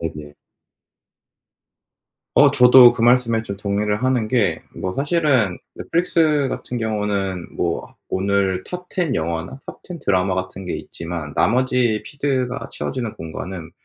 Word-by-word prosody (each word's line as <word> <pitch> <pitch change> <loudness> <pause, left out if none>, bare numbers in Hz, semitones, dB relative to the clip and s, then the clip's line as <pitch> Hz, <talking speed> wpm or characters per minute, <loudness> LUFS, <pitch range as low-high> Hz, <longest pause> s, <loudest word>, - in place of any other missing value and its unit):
네네. 75 -3 -6 2.0
어 - - +7
저도 125 -1 +8
그 115 - -3
말씀에 120 -2 +3
좀 100 -3 -7
동의를 105 +2 -1
하는 130 -4 +1
게 115 -2 +1
뭐 95 0 -4
사실은 140 - +1 0.2
넷플릭스 155 -5 +1
같은 125 -1 -5
경우는 105 -4 -2
뭐 - - -3
오늘 95 -1 0
톱 180 0 -8
10 170 -8 -1
영화나 85 - -3
톱 - - -10
10 175 -2 -8
드라마 95 -1 +1
같은 95 +1 -5
게 90 - -4
있지만 80 -3 -6
나머지 125 -2 +2
피드가 135 -3 -2
채워지는 120 -5 -4
공간은 80 +1 -7
110 Hz, 255 characters per minute, -21 LUFS, 95-130 Hz, 2.0 s, 저도